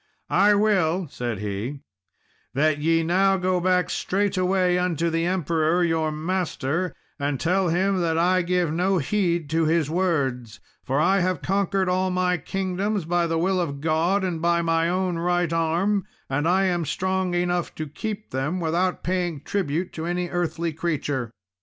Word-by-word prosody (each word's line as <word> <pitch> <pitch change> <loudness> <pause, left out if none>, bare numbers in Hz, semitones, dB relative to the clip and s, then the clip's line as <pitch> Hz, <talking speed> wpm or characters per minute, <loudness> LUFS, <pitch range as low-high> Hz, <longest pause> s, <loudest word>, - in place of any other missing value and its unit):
"I 205 +1 +5
will," 190 -4 +2
said 120 -3 -3
he, 105 +7 -4 0.7
"that 150 +1 +2
ye 165 +2 +2
now 190 +3 +3
go 185 0 +1
back 180 0 +1
straightway 185 -2 +1
unto 170 -2 0
the 165 +1 0
Emperor 170 -1 +1
your 160 -2 +1
master 170 0 -2 0.2
and 140 -2 -1
tell 180 +1 +1
him 185 +2 +1
that 165 -1 0
I 180 +2 +3
give 175 -2 0
no 185 +3 +1
heed 170 0 0
to 165 0 +2
his 155 -1 +1
words, 135 - -1 0.2
for 135 +2 0
I 190 +5 +3
have 185 0 -1
conquered 195 0 0
all 185 +1 +1
my 180 0 +1
kingdoms 190 +3 -2
by 175 0 +1
the 165 0 0
will 185 +2 +1
of 140 -5 -3
God 165 +6 +1
and 175 -4 -2
by 170 0 +2
my 165 0 +1
own 180 -1 -1
right 175 -1 0
arm, 170 +5 +1 0.2
and 145 +4 0
I 185 +3 +3
am 175 -2 +1
strong 185 +3 -1
enough 175 0 -1
to 155 - -4
keep 210 +8 -6
them, 145 +8 -2
without 175 +2 0
paying 175 -5 -1
tribute 180 -2 -2
to 160 +1 -4
any 175 0 -2
earthly 170 -2 -2
creature. 145 -7 -2
175 Hz, 165 wpm, -24 LUFS, 160-185 Hz, 0.7 s, I